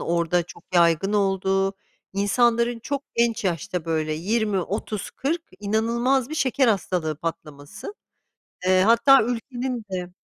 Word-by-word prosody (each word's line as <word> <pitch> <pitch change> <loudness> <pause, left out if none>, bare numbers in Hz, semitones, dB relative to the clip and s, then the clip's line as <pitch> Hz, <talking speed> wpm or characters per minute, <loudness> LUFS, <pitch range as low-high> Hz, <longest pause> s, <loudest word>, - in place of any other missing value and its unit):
orada 170 +1 +1
çok 170 - -14
yaygın 170 +3 +3
olduğu, 195 -1 +1 0.4
insanların 235 +3 +2
çok 280 +4 -4
genç 235 -2 +1
yaşta, 175 -1 -2
böyle, 155 -2 -1
20-30-40; 210 - -2 0.2
inanılmaz 235 +5 +1
bir 310 - -5
şeker 265 -3 +2
hastalığı 180 -6 0
patlaması. 155 - -7 0.7
Eee 185 0 +4
hatta 235 +6 +6
ülkenin 245 +1 -3
de 180 -1 -4
200 Hz, 110 wpm, -24 LUFS, 175-235 Hz, 0.7 s, hatta